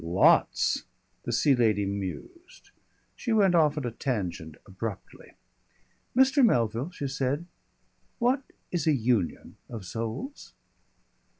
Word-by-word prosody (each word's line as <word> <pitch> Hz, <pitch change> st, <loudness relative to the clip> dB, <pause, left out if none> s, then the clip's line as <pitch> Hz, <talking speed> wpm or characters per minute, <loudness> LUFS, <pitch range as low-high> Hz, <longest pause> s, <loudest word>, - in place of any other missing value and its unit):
"Lots." 85 Hz, +3 st, +3 dB, 0.4 s
The -, -, -2 dB
Sea 145 Hz, -, +3 dB
Lady 110 Hz, -4 st, +2 dB
mused. 100 Hz, -, -7 dB, 0.4 s
She 240 Hz, -, -4 dB
went 200 Hz, -4 st, +4 dB
off 155 Hz, -3 st, +3 dB
at 145 Hz, -, -2 dB
a 120 Hz, -, -2 dB
tangent 90 Hz, -, -3 dB
abruptly. 100 Hz, +1 st, -7 dB, 0.8 s
"Mr. 270 Hz, +1 st, +5 dB
Melville," 120 Hz, -, +2 dB
she 145 Hz, -6 st, -5 dB
said, 135 Hz, +4 st, -1 dB, 0.7 s
"what 255 Hz, +3 st, +2 dB, 0.3 s
is 170 Hz, -4 st, -1 dB
a 155 Hz, -, +5 dB
union 115 Hz, -, -1 dB
of 110 Hz, -5 st, -7 dB
souls?" 115 Hz, -, -6 dB
125 Hz, 115 wpm, -28 LUFS, -, 0.8 s, Mr